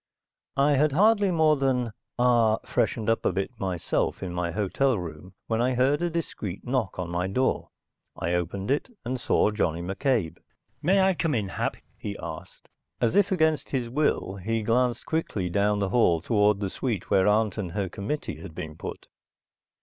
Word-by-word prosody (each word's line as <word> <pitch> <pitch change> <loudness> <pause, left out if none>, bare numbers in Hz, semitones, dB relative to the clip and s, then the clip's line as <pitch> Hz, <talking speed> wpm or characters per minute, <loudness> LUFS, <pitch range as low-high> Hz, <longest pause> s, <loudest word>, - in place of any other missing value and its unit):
I 140 +2 +4
had 145 +1 +3
hardly 205 +3 +4
more 160 -3 +4
than 130 -4 +1 0.3
ah 120 -3 +4
freshened 110 -3 0
up 115 0 +2
a - - +2
bit 95 +5 -2
myself 95 -1 -1
in 90 -2 -4
my 90 -1 -1
hotel 105 +7 +1
room, 90 +1 -8
when 115 0 0
I 125 +1 +1
heard 135 +5 +2
a 175 - +1
discreet 130 - -4
knock 125 -6 -1
on 90 -2 -4
my 90 +1 -1
door. 130 +7 0 0.5
I 85 - -1
opened 90 +5 -2
it 145 - 0 0.2
and 125 +1 -2
saw 105 - +2
Johnny 85 -5 -1
McCabe. 95 - -1 0.4
"May 190 +5 +4
I 190 0 +4
come 165 -4 0
in, 105 -4 -1
Hap?" - - -2 0.2
he 100 -1 -5
asked. 80 - -9 0.3
As 120 -2 +1
if 200 0 +4
against 160 -4 +2
his 125 -4 -2
will, 125 -8 0
he 110 +4 -2
glanced 120 +2 +1
quickly 105 - -2
down 105 +2 +2
the 100 -1 0
hall 95 -9 +3
toward 105 +2 +2
the 95 -2 -2
suite 115 -8 -3
where 95 0 +4
aunt 105 0 +2
and 90 -5 -4
her 100 -1 -1
committee 105 - -4
had 85 -5 -10
been 80 -3 -6
put. - - -7
110 Hz, 180 wpm, -26 LUFS, 95-135 Hz, 0.5 s, I